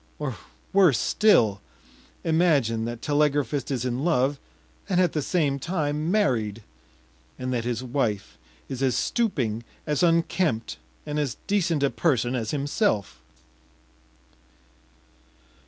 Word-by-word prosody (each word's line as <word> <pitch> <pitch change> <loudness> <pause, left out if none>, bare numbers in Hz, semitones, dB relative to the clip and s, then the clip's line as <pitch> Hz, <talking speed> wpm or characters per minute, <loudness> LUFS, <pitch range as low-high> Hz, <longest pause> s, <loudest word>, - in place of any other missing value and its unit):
Or - - -3 0.4
worse 185 -10 +5
still: 115 - +3 0.6
imagine 145 -10 +2
that 120 0 -6
telegraphist 145 -2 +1
is 130 -3 -2
in 125 +2 -2
love, 140 -4 +1 0.5
and 185 -2 +2
at 180 -3 +3
the 150 - 0
same 145 -3 0
time 155 -1 -1
married, 115 - +1 0.7
and 130 0 -3
that 120 -2 -1
his 120 0 -2
wife 120 -6 -2 0.3
is 130 -1 -5
as 130 -4 +2
stooping, 125 - 0 0.2
as 150 -2 0
unkempt, 165 -7 +1 0.3
and 150 0 -2
as 140 -5 -2
decent 175 -7 +1
a 140 - +2
person 130 -7 +1
as 115 -4 -2
himself. 140 - -1
140 Hz, 120 wpm, -25 LUFS, 120-165 Hz, 0.7 s, worse